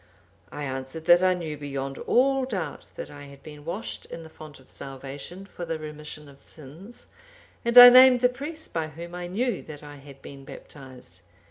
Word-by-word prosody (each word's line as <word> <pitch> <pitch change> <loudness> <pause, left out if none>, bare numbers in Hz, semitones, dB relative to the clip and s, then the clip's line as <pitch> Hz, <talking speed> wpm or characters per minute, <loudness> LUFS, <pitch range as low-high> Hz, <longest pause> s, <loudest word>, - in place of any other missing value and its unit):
I 145 - -6
answered 135 +4 -6
that 175 +1 +6
I 185 0 +3
knew 160 -4 -5
beyond 135 -1 -5
all 270 +1 +2
doubt 195 -10 -5
that - - -7
I 145 0 -11
had 140 -1 -15
been 150 -1 -12
washed 180 +8 -6
in 165 - -9
the 160 - -13
font 155 -3 -13
of 130 - -19
salvation, 140 +7 -8
for 180 - -9
the 165 -1 -3
remission 150 -1 -9
of 140 -1 -17
sins, 160 - -13 0.6
and 235 +1 0
I 245 0 +14
named 255 0 +7
the 250 - +6
priest 290 +6 -7
by 160 -2 -2
whom 170 +3 -10
I 175 0 -6
knew 235 +7 -2
that 150 -1 -11
I 145 -1 -11
had 140 -1 -14
been 140 -1 -11
baptized. 130 -2 -13
155 Hz, 195 wpm, -25 LUFS, 140-195 Hz, 0.6 s, I